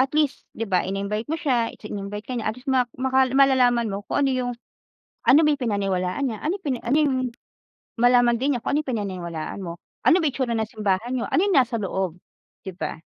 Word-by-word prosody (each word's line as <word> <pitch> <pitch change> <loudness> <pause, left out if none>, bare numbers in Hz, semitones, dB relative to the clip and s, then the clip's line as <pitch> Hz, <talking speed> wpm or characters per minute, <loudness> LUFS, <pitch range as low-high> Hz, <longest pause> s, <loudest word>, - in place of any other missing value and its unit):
At 265 +1 +2
least, 300 -3 +1
'di 225 - -2
ba 185 -2 +2
in-invite 200 +5 -3
mo 320 - -1
siya, 245 -7 +1
its - - -17
in-invite 205 0 -5
ka 255 - -4
niya 225 -3 -2
at 215 - -3
least 250 +3 -15
ma 250 -2 +2
maka 265 0 +3
malalaman 250 -4 +4
mo 200 - -3
kung 285 - +1
ano 270 - +2
yung, 250 -1 -1 0.8
ano 280 - +8
ba - - +4
yung 285 - -3
pinaniwalaan 195 0 -1
niya, 225 -4 -3
anong 370 +6 -2
pina 265 -4 -1
ano 245 +5 +1
yung 290 -4 +2 0.8
malaman 245 0 +5
din 275 +3 +1
niya 245 - -2
kung 280 - 0
ano - - +3
yung 265 - -4
pinaniniwalaan 180 -6 -4
mo. 170 - -4 0.3
Ano - - +6
ba - - +1
itsura 260 -3 -2
ng 220 -1 -1
simbahan 215 0 -1
n'yo 240 - -1
ano - - +2
yung 400 -3 +2
nasa 250 -3 +3
loob, 190 -3 -3 0.4
di 190 - -6
ba? 155 -4 -4
240 Hz, 225 wpm, -24 LUFS, 200-265 Hz, 0.8 s, ano